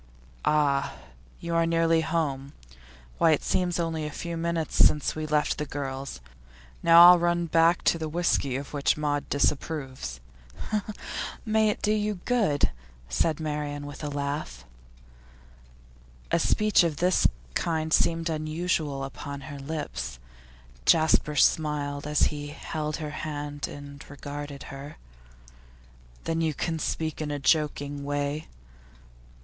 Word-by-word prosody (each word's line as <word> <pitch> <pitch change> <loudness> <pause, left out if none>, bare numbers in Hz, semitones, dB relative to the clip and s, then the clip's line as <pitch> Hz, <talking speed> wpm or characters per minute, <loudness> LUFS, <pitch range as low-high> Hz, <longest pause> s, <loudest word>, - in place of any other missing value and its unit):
'Ah, 140 -2 +2 0.4
you 170 0 -4
are 165 0 +3
nearly 165 0 +3
home. 145 -4 -2 0.7
Why, 165 -1 +5
it 150 - 0
seems 180 -2 0
only 165 -2 -1
a 150 - -3
few 170 +3 -5
minutes 165 -1 -2
since 150 -2 +4
we 155 0 -3
left 150 -1 +1
the 150 - -1
girls. 135 - -5 0.6
Now 170 +1 +9
I'll 180 -1 +8
run 175 0 +1
back 165 +1 +3
to 165 - +3
the 160 -1 -3
whisky 150 -5 +1
of 140 +2 -5
which 145 0 +1
Maud 145 -1 -1
disapproves.' 135 - -1 1.3
'May 220 -1 +3
it 210 - -3
do 210 - +3
you 210 0 0
good!' 210 - +2 0.4
said 155 - +1
Marian 150 -2 -3
with 145 +1 -8
a 150 - -2
laugh. 145 +1 -4 1.7
A - - +3
speech 215 -3 +3
of 160 -4 -1
this 180 +3 +3 0.3
kind 160 - -1
seemed 165 0 +2
unusual 155 -2 -1
upon 140 +1 -6
her 140 0 -8
lips. 140 - -4 0.7
Jasper 155 - +4
smiled 145 -1 +1
as 150 0 +2
he 145 0 -5
held 150 0 -4
her 155 -2 -5
hand 145 -1 -4
and 140 0 -9
regarded 145 0 -7
her. 140 +2 -9 1.3
'Then 165 0 -1
you 160 -2 0
can 165 -2 -2
speak 160 0 -2
in 150 - -2
a 145 - -2
joking 145 -1 +1
way? 145 +2 -2
150 Hz, 135 wpm, -27 LUFS, 145-165 Hz, 1.7 s, Now